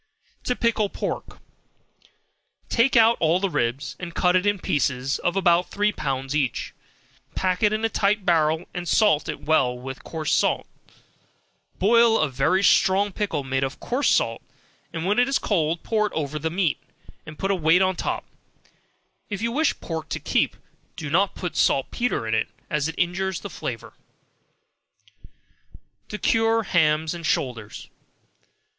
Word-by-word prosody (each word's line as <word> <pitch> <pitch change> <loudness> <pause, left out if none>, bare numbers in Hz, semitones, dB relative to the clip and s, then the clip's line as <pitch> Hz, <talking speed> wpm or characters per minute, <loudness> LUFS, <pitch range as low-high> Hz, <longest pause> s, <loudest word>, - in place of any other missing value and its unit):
To 250 - 0
Pickle 225 -4 +1
Pork. - - -5 1.3
Take 245 +3 +2
out 230 +1 +5
all 165 +2 +2
the 195 -1 -1
ribs, 120 +2 -2
and 175 -2 -7
cut 180 0 +3
it 185 +2 +2
in 205 0 +2
pieces 135 -5 -1
of 175 - -1
about 175 -2 +3
three 210 +1 +1
pounds 135 -5 -3
each; 135 -5 -1 0.6
pack 185 -1 0
it 210 -1 +4
in 215 +1 -1
a - - +4
tight 205 -2 0
barrel, 160 -1 +2
and 175 -1 -5
salt 200 -6 +3
it 155 - -5
well 135 -6 +2
with 130 +1 -8
coarse 160 -2 -3
salt; - - +1 1.1
boil 230 +3 +4
a 155 - +1
very 140 +9 +1
strong 200 +1 +4
pickle 185 -8 -2
made 135 0 -1
of 135 0 -4
coarse 260 +4 0
salt, - - +1 0.5
and 165 0 -4
when 205 +5 +2
it 245 - +4
is 270 - +2
cold 165 -4 -1
pour 215 -2 +1
it - - -10
over 150 -1 -3
the 160 +2 -2
meat, 170 -2 0 0.5
and 155 0 -9
put 195 - -1
a - - +2
weight 170 +2 +4
on 190 0 +2
the - - -4
top; - - -3 1.0
if 205 -2 -4
you 230 +2 -1
wish 305 +5 +1
pork 160 -1 -5
to - - -3
keep, - - 0 0.4
do 150 -3 -6
not 190 +4 +2
put 180 -3 -5
saltpetre 135 - 0
in, 110 0 0 0.2
as 150 0 0
it 165 - -5
injures 180 +1 -1
the - - -7
flavor. - - -6 2.2
To 210 - -4
Cure 225 +1 +2
Hams 160 -4 +2
and 170 -1 -8
Shoulders. 120 -8 -2
175 Hz, 165 wpm, -24 LUFS, 150-205 Hz, 2.2 s, out